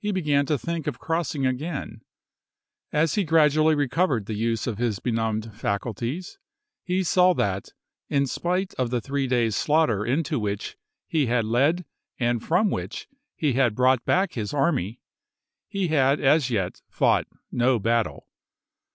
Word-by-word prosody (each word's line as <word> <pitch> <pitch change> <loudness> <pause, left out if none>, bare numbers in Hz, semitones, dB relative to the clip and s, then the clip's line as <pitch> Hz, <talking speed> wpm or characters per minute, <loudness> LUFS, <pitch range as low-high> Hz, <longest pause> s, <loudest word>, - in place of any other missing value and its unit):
began 150 -7 +1
to 150 - +1
think 165 +2 -4
of - - -2
crossing 160 -4 -2
again; 130 -3 -3 0.9
as 150 0 +2
he 205 - +1
gradually 155 -1 +4
recovered 145 - +1
the 110 - -4
use 115 0 -1
of 115 -4 -3
his 120 -4 0
benumbed 110 -1 -2
faculties 120 - -3 0.4
he 185 +1 -1
saw 180 +1 +4
that 95 -1 -1 0.4
in 140 -1 +2
spite 180 +7 -2
of 125 -2 +1
the 125 0 0
three 140 +2 -2
days' 120 -4 +1
slaughter 145 -9 +2
into 145 +4 0
which 100 -2 -3 0.3
he 150 -5 0
had 115 -1 +1
led 140 +10 +2 0.3
and 120 -2 0
from 185 +5 +2
which - - -4 0.3
he 150 -4 0
had 120 -4 +2
brought 130 0 +3
back 190 +1 +1
his 110 +3 -4
army, 135 - 0 0.7
he 195 -3 -2
had 140 -2 +3
as 145 -1 +3
yet 100 -7 -2
fought - - +2 0.2
no 125 +1 +2
battle. 115 +1 -1
135 Hz, 150 wpm, -25 LUFS, 115-160 Hz, 0.9 s, gradually